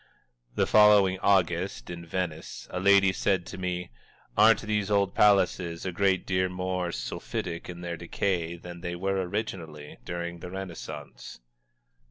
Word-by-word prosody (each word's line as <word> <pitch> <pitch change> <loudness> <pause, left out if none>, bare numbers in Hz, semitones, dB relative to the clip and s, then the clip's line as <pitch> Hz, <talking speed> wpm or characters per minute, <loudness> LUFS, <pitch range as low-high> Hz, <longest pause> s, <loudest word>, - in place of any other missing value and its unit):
The - - +2
following 105 -3 +5
August, 90 -7 +1
in 85 -1 -8
Venice, 80 -8 -4
a 90 - -3
lady 100 0 +5
said 95 -1 0
to - - -8
me: 90 -3 -3 0.4
"Aren't 110 +1 +5
these 105 -2 -1
old 100 -2 +2
palaces 95 -4 +3
a 95 - -1
great 95 +1 +1
deal 95 -1 +1
more 90 -1 -2
sulphitic 85 +6 -5
in 90 -1 -7
their 85 -1 -4
decay 85 0 -2
than 85 0 -10
they 85 -1 -4
were 95 +2 -1
originally, 90 -6 -5
during 85 0 -5
the 90 - -8
Renaissance?" 80 -8 -8
90 Hz, 145 wpm, -28 LUFS, 85-95 Hz, 0.4 s, following